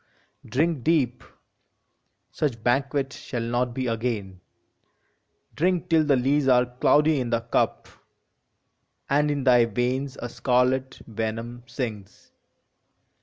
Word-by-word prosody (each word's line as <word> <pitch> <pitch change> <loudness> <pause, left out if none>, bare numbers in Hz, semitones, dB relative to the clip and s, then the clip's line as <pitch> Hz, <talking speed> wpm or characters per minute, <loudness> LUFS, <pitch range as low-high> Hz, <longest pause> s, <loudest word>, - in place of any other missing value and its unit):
Drink 155 0 0
deep: 150 -7 +1 1.1
such 120 -7 -2
banquet 135 +2 0
shall 120 -3 -5
not 120 +1 -1
be 130 - -2
again. 110 -6 -3 1.1
Drink 180 +2 0
till 160 -1 +5
the 145 -2 +4
lees 135 +2 +1
are 125 -1 +5
cloudy 145 +5 +2
in 120 - -3
the 115 0 0
cup, 115 - -1 1.2
And 150 +1 +3
in 145 -2 -1
thy 125 -2 +5
veins 125 +4 -2
a 120 - -4
scarlet 130 +2 0
venom 115 +2 -4
sings! 115 -5 -6
125 Hz, 115 wpm, -25 LUFS, 120-140 Hz, 1.2 s, till